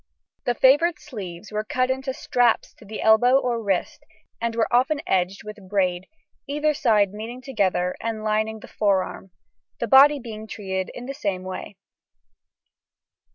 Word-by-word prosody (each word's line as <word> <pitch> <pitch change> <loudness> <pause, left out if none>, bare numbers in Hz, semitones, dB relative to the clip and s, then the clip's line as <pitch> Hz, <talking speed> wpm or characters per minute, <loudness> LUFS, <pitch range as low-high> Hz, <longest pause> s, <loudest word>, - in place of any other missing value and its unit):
The 245 - +1
favoured 295 +7 +4
sleeves 205 - -9
were 215 0 -2
cut 255 +4 0
into 265 +1 -2
straps 245 -2 +1
to 220 - -15
the 215 +1 -6
elbow 245 +4 +5
or 245 -3 -1
wrist, 195 -4 -2 0.4
and 230 -1 -1
were 230 -1 +2
often 265 +5 +3
edged 185 +1 0
with 210 -2 -10
braid, 185 -2 0 0.4
either 300 +2 +1
side 215 -9 +2
meeting 225 +4 -7
together 195 -8 0
and 225 -1 -3
lining 215 0 -1
the - - -11
forearm, 195 -2 -1 0.5
the - - 0
body 280 +3 +7
being 220 -4 -8
treated 190 -3 -4
in 245 - -7
the 275 - -5
same 200 -9 -3
way. 185 +2 -7
220 Hz, 155 wpm, -24 LUFS, 200-255 Hz, 0.5 s, body